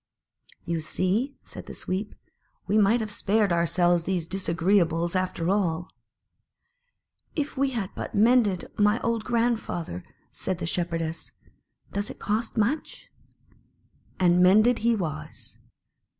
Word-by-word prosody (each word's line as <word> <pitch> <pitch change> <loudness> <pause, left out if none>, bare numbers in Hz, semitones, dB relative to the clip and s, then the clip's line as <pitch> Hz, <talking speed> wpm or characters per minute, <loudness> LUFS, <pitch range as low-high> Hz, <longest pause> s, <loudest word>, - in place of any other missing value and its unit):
"You 170 -1 -2
see," 200 - 0
said - - -10
the - - -8
Sweep, 195 +3 -3 0.5
"we 205 - 0
might 215 +3 +4
have 215 -1 -4
spared 205 -2 +2
ourselves 170 0 +2
these 180 -4 -1
disagreeables, 170 -1 +1
after 185 -1 0
all." 180 -4 -1 1.4
"If 295 -2 -2
we 275 0 +1
had 220 -7 -3
but - - -6
mended 215 -3 +3
my 210 +2 +4
old 230 -1 -1
grand 235 -1 +1
father!" 160 - -5 0.3
said 185 - -3
the 170 - -4
Shepherdess. 165 -1 -3 0.6
"Does 200 +1 -2
it - - -8
cost 220 +3 -2
much?" 235 +9 -2 1.1
And 180 -1 +4
mended 215 +6 +5
he 235 +1 +2
was. 165 -8 -6
195 Hz, 125 wpm, -26 LUFS, 175-220 Hz, 1.4 s, mended